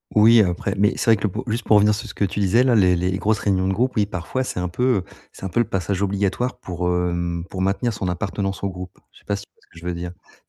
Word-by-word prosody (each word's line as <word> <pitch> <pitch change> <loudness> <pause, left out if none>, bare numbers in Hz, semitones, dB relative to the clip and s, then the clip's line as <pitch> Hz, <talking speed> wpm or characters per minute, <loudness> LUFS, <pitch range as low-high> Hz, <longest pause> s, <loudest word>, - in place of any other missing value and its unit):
Oui 110 +1 +7
après 95 +2 -1
mais 105 +1 +3
c'est - - -2
vrai - - +7
que 100 - -9
le 105 - +2
po 110 +7 -5
juste 115 +2 -2
pour 110 - +4
revenir 105 +1 +4
sur 105 - -6
ce - - -9
que - - -2
tu 100 +2 -4
disais 105 +5 +4
là, 130 -2 +3
les 90 -4 +4
les 90 +2 0
grosses 110 +1 +1
réunions 95 -2 +1
de 95 - +1
groupe, 125 +5 0
oui, 105 -3 +3
parfois 100 +7 -3
c'est 90 - -4
un 90 - -1
peu, 95 +8 -3
heu, 95 - -2 0.3
c'est - - -15
un 95 - -2
peu 120 - 0
le 120 - +3
passage 95 +1 -1
obligatoire 100 +6 -1
pour, 90 -3 -4
hem, 85 -1 -1
pour 95 - -4
maintenir 100 +5 0
son 95 - -3
appartenance 95 +1 -3
au 100 - 0
groupe. 90 -1 -9
Je - - -19
sais - - -28
pas 100 - -1
si 100 - -7
tu - - -51
vois - - -34
ce - - -28
que 85 - -12
je 85 - -12
veux 90 - -1
dire? 85 0 -5
C'est - - -24
95 Hz, 315 wpm, -22 LUFS, 90-105 Hz, 0.3 s, Oui